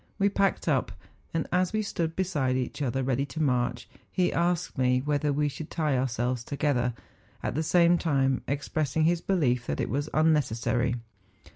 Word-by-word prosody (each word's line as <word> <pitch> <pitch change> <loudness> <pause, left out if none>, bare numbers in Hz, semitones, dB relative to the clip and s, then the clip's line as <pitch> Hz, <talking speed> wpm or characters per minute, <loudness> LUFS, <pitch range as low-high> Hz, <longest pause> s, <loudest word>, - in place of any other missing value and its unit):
We 200 0 +3
packed 195 -3 0
up, 135 -9 +1 0.4
and 165 - -1
as 185 +2 +1
we 215 0 +1
stood 165 -5 -2
beside 150 -9 0
each 130 +3 -3
other 130 -1 0
ready 130 +1 +1
to 135 +3 -7
march, 125 -4 0 0.2
he 180 -2 +1
asked 175 0 0
me 125 -1 +2
whether 145 +1 0
we 150 +1 +1
should 145 +2 -6
tie 155 -4 0
ourselves 125 -1 -1
together, 130 -4 0 0.5
at - - -1
the 155 - 0
same 170 +1 +4
time 135 -5 +1
expressing 145 +1 -1
his 170 +1 +2
belief 125 -11 +1
that - - -2
it - - -1
was 145 +4 -1
unnecessary. 125 -6 +2
145 Hz, 170 wpm, -28 LUFS, 125-165 Hz, 0.5 s, same